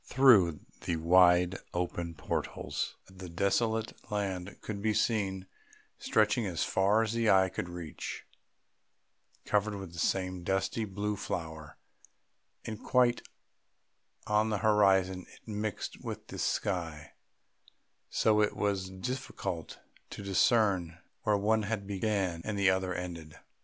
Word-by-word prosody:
Through 105 - +5 0.2
the 85 - -1
wide 90 +2 +5 0.2
open 85 -1 -2
portals - - -3
the 95 -1 -10
desolate 110 +5 0 0.2
land 100 -3 -3
could 100 -2 -5
be 110 0 +1
seen, 95 -5 0 0.5
stretching 110 +2 +2
as 85 -3 -1
far 100 +4 +3
as 110 0 -2
the 115 -1 +2
eye 95 -1 +5
could 85 - -4
reach, 85 -3 -6 1.2
covered 105 0 +1
with 95 -4 -8
the 85 - -7
same 95 +2 0
dusty 95 +4 0
blue 105 +1 -2
flower, 80 -5 -5 0.9
and 110 0 -6
quite 125 -2 +3 1.0
on 105 +1 +2
the 105 - 0
horizon 95 -3 +3
it - - -19
mixed 105 -1 -4
with - - -7
the - - -7
sky, 80 -6 -2 1.0
so 110 -1 +3
that 105 - +6
it - - -11
was 100 -2 0
difficult 95 - -5 0.3
to - - -8
discern 95 -3 +2 0.2
where 105 -1 +2
the - - 0
one 110 +1 +3 0.2
began 100 -4 -1
and 105 -1 -3
the 100 -1 +4
other 95 0 0
ended. 85 -4 -6
95 Hz, 130 wpm, -31 LUFS, 90-105 Hz, 1.2 s, that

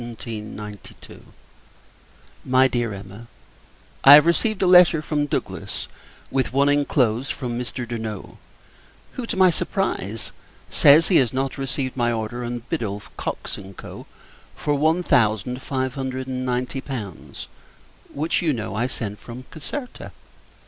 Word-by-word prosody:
] 120 -1 -8 2.3
MY 130 +1 +4
DEAR 120 -3 -1
EMMA, 100 +3 -9 0.8
I 140 - +11
have 150 - +7
received 195 +4 +1
a - - +4
letter 180 -3 +7
from 150 -1 -1
Douglass; - - -4 0.4
with 130 -2 0
one 140 +2 +3
inclosed, 135 -3 +1
from 125 -3 -4
Mr. 125 0 -5
Durno; 110 -4 -6 0.7
who, 245 -3 -6
to - - -3
my 185 -1 +6
surprise, 115 - -2 0.4
says, 150 +3 +6
he 185 - +5
has 125 -4 +3
not 135 +1 -2
received 130 -1 -2
my 120 -2 +1
order 115 +2 -3
on 120 0 -4
Biddulph, 105 -10 -4
Cockes, - - -5
and 95 -1 -12
Co. - - -10 0.5
for 145 - -1
one 160 +5 +2
thousand 120 - +2
five 130 -2 -2
hundred 130 -1 -4
and 130 -1 -3
ninety 125 +2 -2
pounds; 110 - -7 0.7
which, 155 +6 0
you 160 -4 +1
know, 110 -5 -4
I 115 +4 0
sent 105 -5 -5
from 120 +2 -9
Caserta. 250 - -7
130 Hz, 140 wpm, -23 LUFS, 115-145 Hz, 2.3 s, I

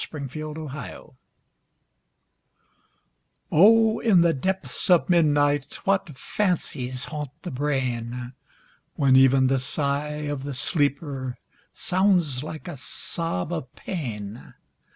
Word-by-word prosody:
IN 140 -3 -4
THE 155 +2 -6
DARK 140 -2 -9 2.4
O 220 +5 +6
In 200 -7 +4
the 170 -1 +4
depths 190 +7 -2
of 175 -2 +5
midnight 145 -4 +2
What 190 -7 0
fancies 130 -11 -2
haunt 150 -2 -5
the 180 - -5
brain! 125 -3 -2 0.6
When 135 -3 +4
even 135 0 +6
the 135 0 +2
sigh 145 +3 -2
of 145 -2 -3
the 140 0 -5
sleeper 140 -1 -1 0.3
Sounds 180 -9 +1
like 155 +3 -7
a 175 - -6
sob 165 - -3
of 130 -7 -5
pain. 115 - -6
145 Hz, 110 wpm, -25 LUFS, 130-170 Hz, 2.4 s, O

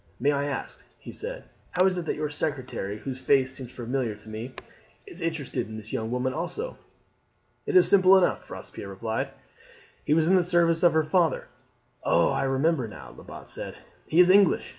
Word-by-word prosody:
May 140 +4 +3
I 140 0 0
ask," 145 -2 -5
he - - -10
said, - - -5 0.3
"how 180 - +3
it - - +6
is 180 -2 -3
that 160 - -2
your 150 0 -2
secretary, 140 -9 -3
whose 130 +3 -6
face 130 -2 +2
seems 130 -2 -8
familiar 120 -2 -3
to 105 +1 -15
me, 110 +4 -7 0.5
is 395 - -8
interested 160 -8 -2
in 110 0 -8
this 110 0 -9
young 110 0 -2
woman 125 +2 -1
also?" 440 - -4 0.9
"It 420 - -1
is 370 - +8
simple 190 -1 +7
enough," 185 - +1
Robespierre - - -8
replied. 110 +3 -3 0.7
"He 150 - +2
was 160 -1 +3
in 180 - +3
the 185 - +5
service 170 -1 +2
of 175 -2 +5
her 160 0 +3
father." 165 +1 +1 0.5
"Oh, - - +3
I - - 0
remember 135 0 +1
now," 65 -12 -11
Lebat - - -11
said. - - -7 0.3
"He 160 - +2
is 180 0 +8
English. 195 -2 +4
145 Hz, 190 wpm, -26 LUFS, 125-175 Hz, 0.9 s, is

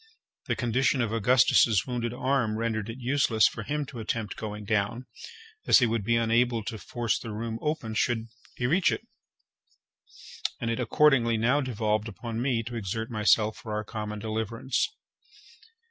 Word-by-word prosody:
The - - 0
condition 125 +2 +1
of 115 -2 -1
Augustus's 115 -1 +4
wounded 120 -2 -2
arm 125 -3 0
rendered 110 -1 -2
it 115 - -6
useless 125 -4 +3
for - - -5
him 145 +5 -2
to 130 -3 -9
attempt 110 -1 -3
going 105 -1 -6
down, 110 +4 -1 0.6
as - - +8
he 125 - +4
would 115 -2 -1
be 115 +3 +2
unable 115 0 +2
to 110 0 -5
force 120 0 -2
the 115 - -7
room 115 +1 -4
open 150 -8 -2
should 115 +1 0 0.3
he 120 - -2
reach 170 +8 +3
it, - - -4 1.5
and 115 - -1
it 115 - -2
accordingly 120 -2 +3
now 125 +6 +2
devolved 110 -4 -1
upon 115 +1 -5
me 120 -3 0
to 120 +2 -7
exert 110 +2 -3
myself 110 0 +3
for 110 - -7
our 105 0 -2
common 105 0 -5
deliverance. 110 +4 -1
115 Hz, 160 wpm, -27 LUFS, 110-125 Hz, 1.5 s, as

